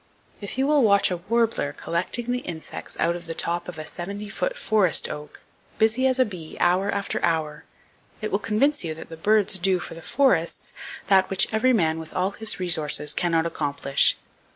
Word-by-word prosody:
If 200 +4 -4
you 265 - +2
will 295 0 +3
watch 200 -4 +4
a 180 - -1
warbler 220 -5 0
collecting 185 +11 -3
the 250 +1 -2
[Page - - -18
219] 175 - -4
insects 160 - -6
out 170 +1 +1
of 175 -1 -8
the 165 - -4
top 170 +1 0
of 180 -3 -8
a 155 - -6
seventy 200 +5 -5
foot - - -3
forest 210 - +1
oak, 150 -1 -9 0.3
busy 225 +4 +3
as 260 0 +2
a 255 - +4
bee 180 -7 -9
hour 185 +3 +2
after 200 0 -2
hour, 160 -2 -1 0.5
it 215 - -4
will 200 - +1
convince 270 +7 +1
you 160 -2 -4
that 160 - -10
the - - -8
birds 205 +2 +2
do 185 +1 +2
for 175 - -7
the 165 - -10
forests 210 -8 +1 0.3
that 190 -1 +4
which 195 +2 +2
man 220 -9 +2
with 160 - -10
all 185 +2 +1
his 220 0 -2
resources 155 -4 +1
cannot 165 -2 +1
accomplish. 140 -4 +1
185 Hz, 200 wpm, -24 LUFS, 165-220 Hz, 0.5 s, watch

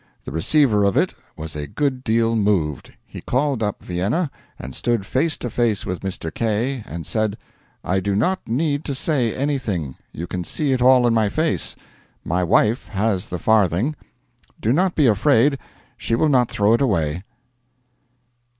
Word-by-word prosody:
The - - -7
receiver 105 - +3
of 100 -1 +2
it - - +2 0.2
was 80 -1 -7
a 75 -1 -4
good 130 - -2
deal 115 0 +2
moved. 95 - 0
He - - -10
called 135 -1 0
up 105 -2 -2
Vienna, 105 - -1 0.3
and 65 +1 -8
stood 120 - -1
face 150 +8 0
to - - -4
face 115 -3 0
with 90 - -3
Mr. 90 -4 -5
K., 115 +3 -1
and 85 0 -6
said: 110 +1 -1 0.5
'I 95 +2 0
do 100 +1 -1
not 185 - 0
need 145 +4 0
to 140 - -2
say 130 -5 0
anything: 115 - -2
you 85 - -6
can 90 0 -4
see 145 - -1
it 130 - 0
all 125 0 +6
in 120 - +3
my 110 -2 +2
face. 155 +8 -1 0.5
My 90 +2 0
wife 105 +7 +2
has 100 -1 -1
the 90 - -3
farthing. 110 - +2 0.6
Do 115 - +1
not 180 +4 +1
be 150 - +3
afraid 130 +4 +3 0.4
she 115 - -1
will 155 +6 +2
not 125 -4 +3
throw 105 +2 +2
it 115 - +2
away.' 85 - 0
110 Hz, 170 wpm, -21 LUFS, 95-135 Hz, 0.6 s, all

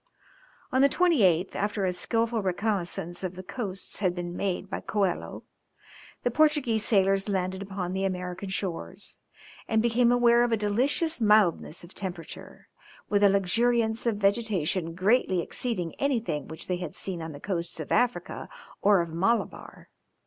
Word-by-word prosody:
On 260 - +3
the 280 - +6
28th, 210 - +3
after 205 -1 -1
a 180 - 0
skilful 230 +4 0
reconnaissance 185 -3 -2
of 185 -1 -3
the 185 - -8
coasts 195 -3 -5
had 185 -3 +1
been 175 0 -5
made 190 0 -2
by 195 - -4
Coelho, 195 -4 -2 0.8
the 245 - +1
Portuguese 270 -6 +3
sailors 195 -1 +2
landed 190 -1 -1
upon 190 -2 -4
the 190 0 -1
American 180 0 -3
shores, 175 - -4 0.5
and 220 - +2
became 235 +1 +3
aware 240 -1 +5
of 240 - 0
a 225 - +3
delicious 250 +9 +1
mildness 210 -7 +3
of 170 - -13
temperature, 180 -4 -6 0.4
with 205 -1 +2
a 200 - +7
luxuriance 220 +4 +1
of 225 -3 +1
vegetation 195 -5 0
greatly 190 0 +2
exceeding 180 -2 -3
anything 230 - -1
which 160 +1 -8
they 180 - -1
had 175 -4 -6
seen 180 -3 -5
on 160 0 -5
the 145 - -9
coasts 170 -2 -3
of 155 - -6
Africa 245 -1 0 0.3
or 200 -2 +5
of 170 - -4
Malabar. 195 +8 -1
195 Hz, 155 wpm, -27 LUFS, 180-230 Hz, 0.8 s, a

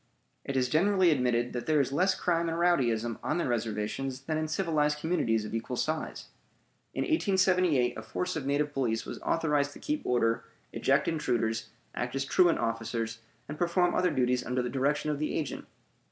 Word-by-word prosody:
It 135 - -3
is 125 -1 +2
generally 185 +4 +3
admitted 125 -4 +1
that 120 - -4
there 155 -1 +3
is 135 -1 +1
less 185 +7 +2
crime 170 -1 +1
and 165 - -2
rowdyism 120 -10 +1
on 150 - -1
the 170 - 0
reservations 120 +3 -2
than 155 +3 -3
in 155 0 -1
civilized 155 -3 +1
communities 135 -9 0
of 105 - -7
equal 115 +2 -3
size. 155 +4 -3 0.7
In - - 0
1878 185 - +2
a - - -6
force 180 +11 -3
of 145 -4 -3
native 145 +1 0
police 120 -5 -1
was - - -7
authorized 150 -3 +1
to - - -12
keep 300 0 -2
order, 115 -2 +1 0.3
eject 135 +1 +2
intruders, 115 -7 -1 0.2
act 125 +1 -3
as 135 0 -1
truant 175 +3 +4
officers, 115 0 -2 0.3
and 150 +1 -7
perform 175 +1 +2
other 180 - +2
duties 125 -4 +1
under 125 0 -1
the 125 - -2
direction 145 +3 0
of 145 - -3
the 155 - -1
agent. 150 -4 -4
140 Hz, 180 wpm, -29 LUFS, 120-165 Hz, 0.7 s, truant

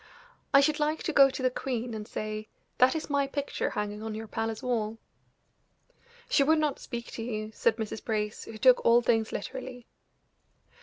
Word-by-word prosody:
I 275 - +7
should 300 +1 +2
like 305 +1 0
to 320 - -2
go 275 -1 +7
to 265 0 -5
the 255 - +3
queen 245 -2 -3
and 215 -1 -6
say: 215 0 -5 0.3
'That 255 +4 +5
is 320 - -3
my 280 -1 +1
picture 285 0 -2
hanging 210 0 -4
on 220 -1 -4
your 220 +1 -5
palace 225 0 -3
wall.'" 225 -3 -1 1.3
"She - - +3
would 315 +3 +4
not 300 -3 0
speak 235 -2 -6
to - - -6
you," 215 -2 -4
said 225 +1 +2
Mrs. 220 -1 -5
Brace, 210 -2 -2
who 225 - -9
took 250 +3 +5
all 235 +1 +5
things 225 -2 +2
literally. 255 +1 -6
235 Hz, 185 wpm, -29 LUFS, 220-275 Hz, 1.3 s, I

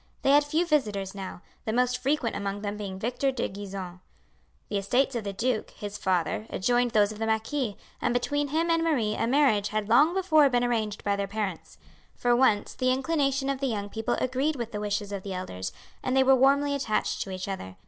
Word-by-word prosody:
They 270 - +4
had 290 +1 +6
few 315 +4 0
visitors 210 - 0
now; 190 -2 -7 0.2
the 220 - -1
most 250 +2 +1
frequent 275 -4 0
among 200 0 -3
them 205 0 -2
being 200 -2 -5
Victor 250 +6 0
de 260 -3 -2
Gisons. 190 -2 -7 0.7
The 205 - -1
estates 250 +8 +1
of 230 - -2
the 200 - -3
duke, 225 +3 -1
his 205 0 -6
father, 185 +3 0
adjoined 245 +5 +1
those 210 -2 +3
of 215 - -9
the 225 - -1
marquis, 220 +1 -1 0.2
and - - +1
between 290 +4 0
him 325 +4 0
and 330 0 +2
Marie 250 -10 +1
a 225 - -1
marriage 245 -6 +3
had 215 -1 -2
long 295 - +5
before 315 -7 +4
been 245 -1 +2
arranged 220 -4 -1
by 200 -1 +1
their 200 0 -2
parents. 200 -4 -4 0.4
For 240 0 +2
once 240 -5 +2
the 255 - 0
inclination 275 0 0
of 275 -1 -1
the 275 - 0
young 205 -4 -3
people 220 +1 -1
agreed 265 +4 0
with 235 -3 -4
the 210 - -4
wishes 205 0 -2
of 200 -1 -4
the 195 0 -5
elders, 95 - -5 0.3
and 255 +1 0
they 265 - +6
were 265 0 +6
warmly 280 +2 +3
attached 245 -6 -1
to - - -4
each 185 0 -5
other. 95 - -5
230 Hz, 215 wpm, -27 LUFS, 205-270 Hz, 0.7 s, had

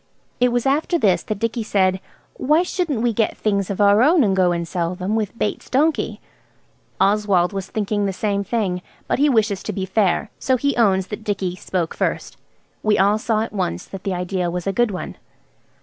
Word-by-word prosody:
It 250 0 +3
was 245 +1 0
after 300 +6 +1
this 200 - +2
that 215 - -4
Dicky 230 +2 -2
said– 190 -3 +1 0.3
"Why 305 +6 +2
shouldn't 335 -10 -2
we 240 -1 +2
get 220 0 0
things 200 -3 0
of 200 - -3
our 205 +1 +5
own 305 +3 +5
and 195 -3 +2
go 185 -2 +3
and 170 -1 -2
sell 175 0 -2
them–with 205 +3 -2
Bates' 210 - -3
donkey?" 300 +4 +1 0.8
Oswald 200 -2 +2
was 195 -1 -4
thinking 205 -1 -1
the - - 0
same 200 +1 -1
thing, 195 -4 -1 0.3
but - - 0
he 295 +1 +4
wishes 210 -6 +1
to - - -4
be 190 -2 -3
fair, 195 +1 +1
so 260 -2 +1
he 280 +3 0
owns 195 -5 +3
that 210 +1 -6
Dicky 195 -4 -2
spoke 180 -3 -3
first. - - -2 0.4
We 215 -1 +2
all 200 +2 +3
saw 220 -1 0
at 225 - -4
once 90 - -2
that 195 - -9
the 195 -2 -1
idea 180 0 -2
was 180 0 -4
a 195 - 0
good 240 +2 +2
one. 185 -3 -6
205 Hz, 200 wpm, -21 LUFS, 190-230 Hz, 0.8 s, our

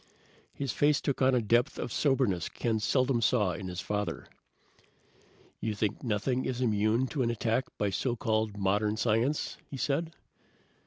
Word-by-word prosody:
His 140 -3 -2
face 145 +4 +3
took 140 - -2
on 130 0 +4
a 120 - +2
depth 120 +3 +2
of - - -4
soberness 130 - +1
Ken 115 -2 -1
seldom 130 +2 +2
saw 105 -5 +3
in 95 +1 -5
his 90 0 -4
father. 105 0 -3 1.3
"You 110 -1 -2
think 105 0 -1
nothing 125 +3 0
is 125 -1 -2
immune 110 +1 +2
to 145 - -2
an 120 - +2
attack 115 +2 0
by 100 -1 0
so 120 +4 -1
called 110 -2 -1
modern 105 +2 +1
science?" 120 +6 0
he 140 - -6
said. 155 +5 -1
115 Hz, 160 wpm, -30 LUFS, 105-130 Hz, 1.3 s, on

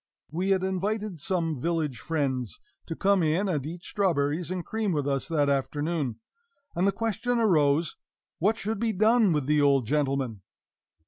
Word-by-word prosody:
We 180 +5 -1
had 190 -1 +2
invited 195 0 -2
some 165 -4 -1
village 160 -7 -1
friends 130 - -2 0.3
to 165 - -4
come 195 +1 +2
in 165 +5 +1
and 150 -8 -1
eat 170 +2 -7
strawberries 170 -4 0
and 180 -2 -3
cream 220 -4 -1
with 145 -2 -1
us 135 -1 -1
that 150 -4 +1
afternoon; 140 0 -1 0.6
and 180 +3 +2
the - - +4
question 230 +3 -1
arose, 160 -7 +2 0.4
what 210 +6 +2
should 215 -1 -3
be 225 -1 0
done 215 +1 +4
with 150 -4 0
the 150 +1 +3
old 140 -3 +3
gentleman? 135 -5 -1
165 Hz, 165 wpm, -27 LUFS, 145-195 Hz, 0.6 s, the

